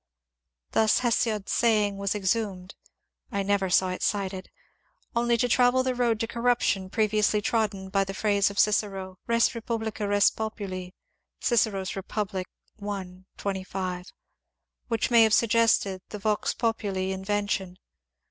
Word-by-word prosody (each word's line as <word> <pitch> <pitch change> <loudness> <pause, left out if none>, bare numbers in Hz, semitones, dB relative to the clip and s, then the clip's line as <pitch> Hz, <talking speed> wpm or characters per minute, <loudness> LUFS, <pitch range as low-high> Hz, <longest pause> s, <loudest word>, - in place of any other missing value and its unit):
Thus 220 -1 +3
Hesiod's 225 -4 0
saying 210 -4 +2
was 200 +1 -1
exhumed 195 -2 -1 0.6
(I 200 0 -1
never 195 -1 +1
saw 185 +1 +3
it 185 - -4
cited) 195 -2 -2 0.7
only 235 0 +2
to 245 - +1
travel 245 +1 +4
the 255 0 0
road 240 -3 +1
to 225 - -1
corruption 235 -5 0
pre 215 +2 +2
viously 210 0 +2
trodden 205 -4 -1
by 195 0 +2
the 195 0 -6
phrase 200 -2 +2
of 200 - -9
Cicero, 195 -3 0
" - - -46
Res 230 -1 +4
publica 220 -2 -3
res 205 0 +4
populi 200 -4 -5 0.3
" - - -55
(Cic. 235 -2 +2
Rep. 195 +1 -6 0.2
i, 185 0 -7
25), 185 -2 -4 0.8
which 230 0 -1
may 235 -1 +7
have 220 -1 +5
suggested 225 -4 +2
the 210 - -6
Vox 210 +1 0
populi 200 -5 -1
invention. 190 -1 -2
205 Hz, 140 wpm, -27 LUFS, 190-225 Hz, 0.8 s, may